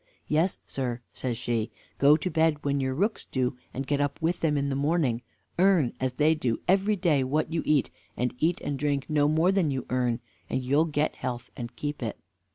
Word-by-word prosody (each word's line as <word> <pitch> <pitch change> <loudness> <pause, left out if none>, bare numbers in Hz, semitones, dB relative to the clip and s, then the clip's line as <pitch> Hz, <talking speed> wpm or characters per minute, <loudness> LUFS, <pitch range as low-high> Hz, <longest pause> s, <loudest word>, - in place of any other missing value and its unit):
"Yes, 160 +5 +2
sir," 125 -3 -3
says 125 -3 -3
she, 115 -2 -1 0.3
"go 145 +2 +7
to 180 +3 -3
bed 160 -2 +2
when 140 0 +1
your 130 -1 -1
rooks 205 +8 0
do 130 -1 -1 0.2
and 135 +2 -4
get 145 +1 0
up 145 -1 -1
with 170 +2 0
them 150 -3 +1
in 140 0 0
the 135 - -1
morning; 140 -4 +1 0.4
earn, 180 -9 +4
as 130 -1 -1
they 150 +4 +4
do, 125 -7 -1
every 195 +3 +3
day 165 -8 +2
what 150 +4 0
you 165 - +1
eat, 150 -3 +3 0.3
and 125 0 0
eat 170 +2 +2
and 140 -2 -3
drink 140 -1 0
no 145 -1 +4
more 160 +4 +3
than 190 -5 +2
you 135 -2 -2
earn: 125 -2 +1 0.3
and 130 - -1
you'll 140 +5 +3
get 150 -1 0
health 125 -2 -5
and 120 -1 -7
keep 145 -1 -4
it. 115 -3 -3
145 Hz, 210 wpm, -27 LUFS, 130-160 Hz, 0.4 s, go